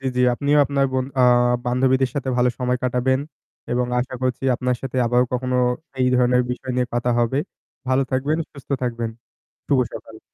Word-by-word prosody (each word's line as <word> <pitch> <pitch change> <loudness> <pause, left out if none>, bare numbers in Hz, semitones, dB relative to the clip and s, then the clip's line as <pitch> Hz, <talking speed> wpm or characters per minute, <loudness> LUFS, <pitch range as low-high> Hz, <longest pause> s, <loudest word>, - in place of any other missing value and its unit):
জি, 135 - -5
জি, 125 - +2
আপনিও 145 +3 +2
আপনার 140 -1 +1
বন 130 -1 0
আ - - +5 0.4
বান্ধবীদের 130 +1 +2
সাথে 135 -2 -3
ভালো 125 0 +3
সময় 125 0 0
কাটাবেন। 125 +2 +1 0.5
এবং 125 0 +1
আশা 130 +1 -3
করছি 130 0 -1
আপনার 125 0 -1
সাথে 130 -1 -5
আবার 125 +1 +3
কখনো 125 0 -1 0.4
এই 125 - +3
ধরনের 125 0 +3
বিষয় 125 +1 -4
নিয়ে 125 -1 +1
কথা 120 0 0
হবে। 120 +4 +1 0.5
ভালো 130 +1 +3
থাকবেন, 145 +5 0
সুস্থ 140 -1 -14
থাকবেন। 115 -2 -2 0.6
শুভ 140 -3 +3
সকাল। 110 -1 -10
125 Hz, 175 wpm, -22 LUFS, 125-130 Hz, 0.6 s, আ